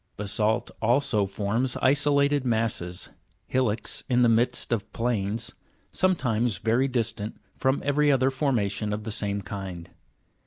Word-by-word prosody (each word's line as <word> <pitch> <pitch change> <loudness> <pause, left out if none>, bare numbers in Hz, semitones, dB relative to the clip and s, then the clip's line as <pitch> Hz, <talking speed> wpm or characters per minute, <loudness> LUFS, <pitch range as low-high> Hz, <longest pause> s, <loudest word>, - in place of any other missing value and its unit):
Basa'lt 105 +3 0
also 120 -3 +2
forms 110 +6 -1
isolated 140 +1 +3
masses, 110 -7 -1 0.3
hillocks 115 -4 -1
in 125 -1 +4
the 120 - +5
midst 120 +2 +1
of 110 -4 -1
planes, 115 -2 -2 0.4
sometimes 120 - +1
very 115 +6 +2
distant 115 -4 -3 0.2
from 130 +1 0
every 145 +1 +3
other 135 0 +3
formation 105 -7 0
of 105 +1 -4
the 110 - -4
same 100 -1 -2
kind. 90 -4 -7
115 Hz, 125 wpm, -26 LUFS, 105-130 Hz, 0.4 s, the